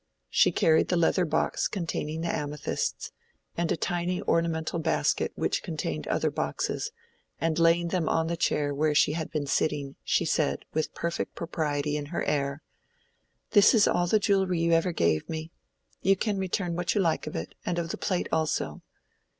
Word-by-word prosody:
She - - +5
carried 160 -1 +3
the 180 - +1
leather 170 +2 +3
box 160 - 0
containing 160 -4 -3
the 170 - -1
amethysts, 150 -1 -3 0.4
and 170 -1 -1
a - - +1
tiny 175 +2 -1
ornamental 165 0 0
basket 160 - +1
which - - 0
contained 80 - -4
other - - +1
boxes, - - -2 0.5
and 165 0 0
laying 170 +1 +4
them 170 -3 0
on 160 - +2
the 170 +1 -1
chair 145 -3 0
where 150 +1 +1
she 150 - +4
had 160 0 -3
been 150 -3 -2
sitting, 140 0 -1
she 170 - +1
said, 155 -1 0
with 155 0 -2
perfect 170 0 -3
propriety 150 -3 -1
in 145 -1 -5
her 170 - -2
air— 140 0 -1 0.9
"This 205 +3 +6
is 215 - +5
all 175 0 +2
the 215 - +4
jewellery 195 -4 +2
you 170 0 +2
ever 165 +2 +3
gave 85 - +1
me. 160 0 -5 0.5
You 195 +1 +4
can 205 0 -1
return 180 -2 -1
what 175 +2 -1
you 205 - +3
like 165 -3 0
of - - -5
it, 80 +2 -5
and 175 - -2
of 170 -1 -2
the - - -3
plate 185 -2 -1
also. 160 -1 -1
165 Hz, 180 wpm, -28 LUFS, 150-175 Hz, 0.9 s, This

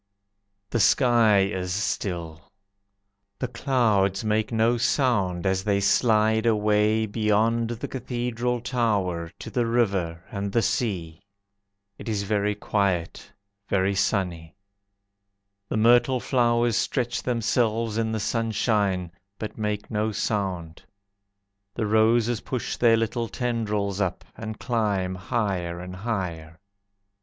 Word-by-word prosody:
The 120 - 0
sky 115 -3 +4
is 95 -2 -2
still. 90 -4 -3 0.9
The 125 - -2
clouds 110 -7 +1
make 110 +1 0
no 115 +1 +2
sound 105 - +1
As 95 0 +1
they 100 -1 +1
slide 110 +2 +3
away 105 0 +2
Beyond 110 +2 +1
the 120 -1 -4
Cathedral 125 -1 -2
Tower, 100 -9 -1
To - - -8
the 120 -2 0
river, 95 -8 0
And 100 -1 -3
the 115 - +2
sea. 85 -9 -2 0.8
It - - -6
is 105 -2 -1
very 105 0 0
quiet, 100 -5 -1 0.4
Very 95 0 +2
sunny. 90 -5 -1 1.1
The - - -1
myrtle 120 +3 +4
flowers 120 -2 +2
stretch 120 -2 -1
themselves 115 -2 0
in 110 -1 0
the 110 - -1
sunshine, 105 -5 0 0.3
But 110 - -6
make 105 -1 -3
no 110 0 0
sound. 95 -6 -3 0.9
The 115 - -1
roses 110 +2 +3
push 125 -3 -3
their 115 -2 +4
little 115 +1 -1
tendrils 105 -4 -2
up, 90 -2 -2
And 110 -1 -6
climb 105 -6 -1
higher 90 -3 -2
and 90 +1 -7
higher. 90 -6 -4
105 Hz, 115 wpm, -25 LUFS, 95-115 Hz, 1.1 s, sky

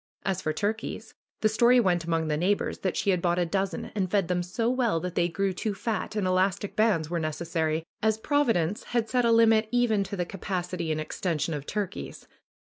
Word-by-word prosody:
As 190 -1 -1
for 155 - -1
turkeys, 210 +7 -3 0.3
the 215 - +4
story 235 +3 +5
went 180 -6 +2
among 165 -1 0
the 150 - 0
neighbors 185 +6 0
that 185 - -2
she 200 - +2
had 180 -2 +1
bought 175 0 +1
a 175 - +2
dozen 195 +3 -2
and 190 -3 -1
fed 195 -3 +1
them 180 0 +1
so 185 +6 -2
well 240 -8 +1
that 180 +1 -4
they 175 -1 +2
grew 190 +3 -1
too 205 +2 -3
fat, 215 0 -3
and 210 -3 0
elastic 185 +2 +1
bands 190 -8 +2
were 170 - 0
necessary, 160 0 -1 0.2
as 220 0 +2
Providence 220 - +1
had 230 -2 +2
set 250 -1 +2
a 230 - +4
limit 225 -1 +5
even 235 -4 +2
to 195 - -5
the 180 -2 -1
capacity 180 -2 -3
and 155 - -1
extension 155 0 -2
of 145 -1 -5
turkeys. 205 -2 -4
190 Hz, 210 wpm, -27 LUFS, 170-220 Hz, 0.3 s, story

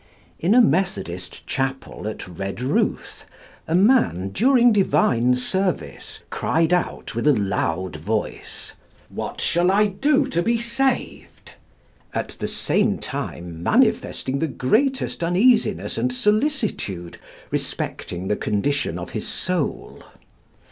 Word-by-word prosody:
In 190 +7 +3
a 250 - +8
methodist 100 - -1
chapel 135 -5 -3
at 110 - -5
Redruth, 100 - -2 0.4
a 160 - +1
man 185 - +3
during 245 - +4
divine 125 - +3
service 185 +9 -2
cried 165 +2 +1
out 180 - -1
with 115 +5 -1
a 150 - +7
loud 95 -4 -1
voice, 105 +7 -4 0.4
"What - - -5
shall 175 +1 +2
I 205 +2 +4
do 270 +8 +2
to 170 - 0
be 230 +6 +1
saved?" 240 +3 -2 0.6
at - - -2
the - - -2
same - - +1
time 85 -1 -5
manifesting 130 +8 +1
the 160 - 0
greatest 260 - 0
uneasiness 210 - +2
and 125 +2 +1
solicitude 210 - -1 0.3
respecting 90 +2 -3
the 105 - +1
condition 105 - -1
of 90 - -7
his 110 - -4
soul. 180 -5 -2
150 Hz, 115 wpm, -22 LUFS, -, 0.6 s, a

